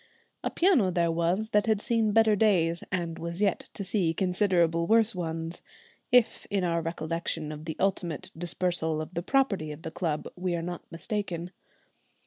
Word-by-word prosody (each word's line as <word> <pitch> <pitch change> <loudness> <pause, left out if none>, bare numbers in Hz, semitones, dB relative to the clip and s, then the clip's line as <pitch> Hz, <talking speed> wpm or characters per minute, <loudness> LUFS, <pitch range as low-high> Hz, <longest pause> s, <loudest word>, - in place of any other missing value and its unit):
A - - 0
piano 335 - +3
there 170 -2 +1
was 175 +6 0
that 210 +1 +3
had 220 -2 +3
seen 225 -1 +1
better 220 0 +5
days, 175 -6 +2
and 170 -3 -2
was 170 +1 -4
yet 200 -3 0
to 200 - -4
see 180 -4 0
considerably 180 -3 +2
worse 225 +1 +4
ones, 165 -1 -4 0.5
if 245 -2 +3
in 200 -2 0
our 170 -1 +1
recollection 165 -1 -2
of 155 0 -8
the 160 - -5
ultimate 185 -5 -1
dispersal 170 -1 -1
of 155 +3 -6
the 170 - -2
property 195 - +1
of 150 +2 -9
the 160 - -5
club 160 -3 -2
we 180 -1 -1
are 165 - -3
not 175 0 -5
mistaken. 175 0 -4
175 Hz, 170 wpm, -28 LUFS, 165-205 Hz, 0.5 s, better